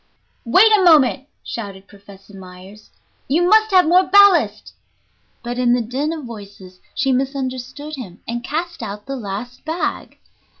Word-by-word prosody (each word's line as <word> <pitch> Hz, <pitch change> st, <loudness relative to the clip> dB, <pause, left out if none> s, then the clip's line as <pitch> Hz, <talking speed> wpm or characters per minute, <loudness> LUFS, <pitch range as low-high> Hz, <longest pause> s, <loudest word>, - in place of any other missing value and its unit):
"Wait 380 Hz, -, +5 dB
a 395 Hz, -, +2 dB
moment," 290 Hz, -5 st, +4 dB, 0.2 s
shouted 195 Hz, -4 st, -8 dB
Professor 200 Hz, 0 st, -16 dB
Myers; 190 Hz, +2 st, -14 dB, 0.4 s
"you 340 Hz, +6 st, +1 dB
must 435 Hz, +2 st, +4 dB
have 370 Hz, -3 st, +4 dB
more 360 Hz, +3 st, +5 dB
ballast." 405 Hz, -2 st, +4 dB, 0.7 s
But 245 Hz, 0 st, -5 dB
in 245 Hz, -1 st, +2 dB
the 245 Hz, -, +1 dB
din 265 Hz, +7 st, -3 dB
of 315 Hz, -4 st, -6 dB
voices 200 Hz, -5 st, -12 dB, 0.2 s
she 270 Hz, -1 st, 0 dB
misunderstood 265 Hz, +2 st, -4 dB
him 195 Hz, -8 st, -10 dB
and 235 Hz, +1 st, -4 dB
cast 335 Hz, +4 st, -4 dB
out 210 Hz, -2 st, -7 dB
the 275 Hz, -, -5 dB
last 230 Hz, +2 st, -7 dB
bag. 320 Hz, +3 st, -4 dB
255 Hz, 145 wpm, -19 LUFS, 205-315 Hz, 0.7 s, Wait